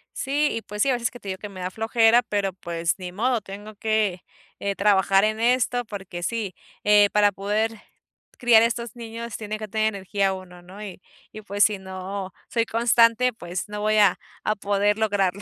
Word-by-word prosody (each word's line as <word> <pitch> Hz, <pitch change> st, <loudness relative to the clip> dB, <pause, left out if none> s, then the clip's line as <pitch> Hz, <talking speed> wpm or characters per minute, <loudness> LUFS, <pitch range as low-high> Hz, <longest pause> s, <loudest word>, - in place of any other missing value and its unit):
Sí, 290 Hz, +2 st, +1 dB
y 230 Hz, -, -3 dB
pues 210 Hz, 0 st, -5 dB
sí, 275 Hz, -, +3 dB
a -, -, +3 dB
veces 235 Hz, -2 st, -1 dB
que 245 Hz, -, -11 dB
te 200 Hz, -, -8 dB
digo 190 Hz, -, -3 dB
que 210 Hz, -, -7 dB
me 185 Hz, -2 st, -9 dB
da 180 Hz, +1 st, -3 dB
flojera, 225 Hz, +2 st, +4 dB
pero 200 Hz, -2 st, -1 dB
pues 170 Hz, -2 st, -2 dB
ni 180 Hz, -1 st, -7 dB
modo, 235 Hz, +4 st, 0 dB
tengo 205 Hz, +2 st, -10 dB
que, 210 Hz, -4 st, 0 dB, 0.4 s
eh, 200 Hz, 0 st, -2 dB
trabajar 195 Hz, -1 st, +3 dB
en 215 Hz, +1 st, 0 dB
esto 245 Hz, 0 st, +2 dB
porque 190 Hz, -4 st, -7 dB
sí, 215 Hz, -5 st, -3 dB, 0.3 s
eh, 205 Hz, -1 st, +6 dB
para 205 Hz, -1 st, +4 dB
poder 210 Hz, +3 st, -1 dB, 0.7 s
criar 235 Hz, -2 st, +6 dB
a -, -, +5 dB
estos 235 Hz, 0 st, -3 dB
niños 230 Hz, -1 st, -7 dB
tiene 215 Hz, 0 st, -5 dB
que 215 Hz, -, -5 dB
tener 215 Hz, +1 st, +1 dB
energía 195 Hz, 0 st, 0 dB
uno, 180 Hz, -2 st, -10 dB
¿no? 185 Hz, +4 st, -12 dB
Y 185 Hz, -3 st, -9 dB, 0.3 s
y 215 Hz, -, -9 dB
pues 205 Hz, 0 st, +1 dB
si 210 Hz, -1 st, +3 dB
no 190 Hz, 0 st, -6 dB, 0.2 s
soy 230 Hz, -1 st, +1 dB
constante, 230 Hz, +1 st, +3 dB
pues 175 Hz, -3 st, -5 dB
no 210 Hz, 0 st, -5 dB
voy 215 Hz, 0 st, +2 dB
a 200 Hz, -4 st, +5 dB, 0.3 s
a 215 Hz, -, +1 dB
poder 205 Hz, +1 st, +1 dB
lograrlo. 200 Hz, -3 st, 0 dB
210 Hz, 200 wpm, -24 LUFS, 195-225 Hz, 0.7 s, eh